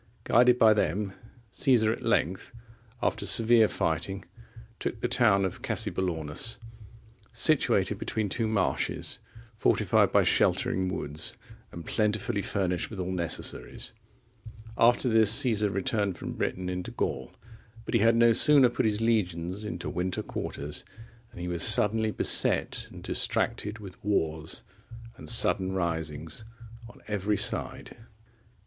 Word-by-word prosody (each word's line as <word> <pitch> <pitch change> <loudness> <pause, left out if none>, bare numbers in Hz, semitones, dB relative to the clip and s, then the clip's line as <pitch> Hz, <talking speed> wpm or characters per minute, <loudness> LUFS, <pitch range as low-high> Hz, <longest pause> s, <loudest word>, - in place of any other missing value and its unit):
Guided 125 +1 +4
by 110 -2 +6
them, 100 0 -1 0.4
Caesar 120 -6 +2
at - - -5
length, 95 +4 -1 0.5
after - - -1
severe 115 -1 +5
fighting, 95 +4 -3 0.5
took 110 - -4
the 120 - -1
town 105 -6 +3
of 95 - -5
Cassobellaunus,(37) 85 +3 -2 0.7
situated - - +2
between 110 -2 -2
two 110 +3 -2
marshes, 105 -4 -2 0.4
fortified - - +2
by - - +4
sheltering 95 0 +1
woods, 75 -4 -3 0.3
and 85 - -9
plentifully 105 -2 -1
furnished 90 -3 -2
with 110 - -8
all 90 0 -3
necessaries. 85 -3 -3 0.8
After 120 +2 +3
this, 110 -3 +4
Caesar 115 -5 +3
returned 100 0 -2
from - - -6
Britain 90 0 -3
into 90 0 -4
Gaul, 65 - -4 0.5
but - - -6
he 115 - +3
had 115 +2 +4
no 115 0 +5
sooner 135 +2 +6
put 120 - 0
his 105 0 -1
legions 95 -4 -1
into 85 -5 -6
winter 90 +1 -3
quarters, 75 +1 -5 0.5
than 115 - -13
he 90 - -4
was 85 -2 -3
suddenly 110 +1 +3
beset - - +2
and - - -12
distracted 105 +2 0
with 100 -4 -12
wars 80 -6 -1 0.5
and 130 - -8
sudden 95 -5 +2
risings 80 0 -3 0.5
on - - -17
every 105 0 -1
side. - - -1
100 Hz, 130 wpm, -27 LUFS, 90-110 Hz, 0.8 s, by